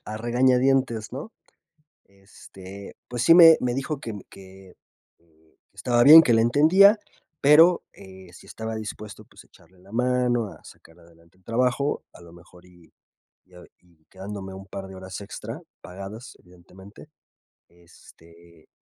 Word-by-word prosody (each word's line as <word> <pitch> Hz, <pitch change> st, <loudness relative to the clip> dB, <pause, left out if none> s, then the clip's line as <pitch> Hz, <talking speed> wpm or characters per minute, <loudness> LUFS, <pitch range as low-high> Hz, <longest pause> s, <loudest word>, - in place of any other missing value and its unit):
a 110 Hz, -, -7 dB
regañadientes, 125 Hz, -1 st, 0 dB
¿no? 140 Hz, -, -9 dB, 0.7 s
Este, 95 Hz, 0 st, -14 dB
pues, 120 Hz, 0 st, -4 dB
sí 165 Hz, -, +6 dB
me 165 Hz, -2 st, +8 dB
me 125 Hz, -1 st, -2 dB
dijo 135 Hz, +2 st, -4 dB
que 115 Hz, -, -8 dB
mm 100 Hz, -, -9 dB
que 95 Hz, -1 st, -16 dB, 0.4 s
que 80 Hz, -1 st, -33 dB, 0.2 s
estaba 120 Hz, -1 st, 0 dB
bien, 155 Hz, +4 st, +10 dB
que 125 Hz, -, +1 dB
le 115 Hz, -, +3 dB
entendía, 180 Hz, -, +4 dB, 0.4 s
pero, 160 Hz, +5 st, +5 dB
eh, 95 Hz, -2 st, -15 dB
si -, -, -16 dB
estaba 110 Hz, 0 st, -7 dB
dispuesto, 105 Hz, -1 st, -9 dB
pues, -, -, -18 dB
a -, -, -28 dB
echarle 90 Hz, +2 st, -25 dB
la 95 Hz, +2 st, -20 dB
mano, 125 Hz, -1 st, -1 dB
a -, -, -20 dB
sacar 80 Hz, +2 st, -18 dB
adelante 85 Hz, +1 st, -24 dB
el 95 Hz, -, -33 dB
trabajo, 125 Hz, +4 st, -2 dB
a -, -, -17 dB
lo 85 Hz, -1 st, -16 dB
mejor, 90 Hz, +1 st, -19 dB
y 90 Hz, -2 st, -23 dB, 0.6 s
ah 90 Hz, -, -14 dB, 0.2 s
y 85 Hz, -3 st, -31 dB
quedándome 95 Hz, 0 st, -9 dB
un 95 Hz, +1 st, -12 dB
par 95 Hz, 0 st, -9 dB
de 95 Hz, -, -12 dB
horas 95 Hz, 0 st, -9 dB
extra, 100 Hz, -, -9 dB, 0.2 s
pagadas 100 Hz, +6 st, -11 dB
evidentemente, 90 Hz, -, -17 dB, 0.6 s
este, 85 Hz, -1 st, -21 dB
100 Hz, 155 wpm, -23 LUFS, 90-125 Hz, 0.7 s, bien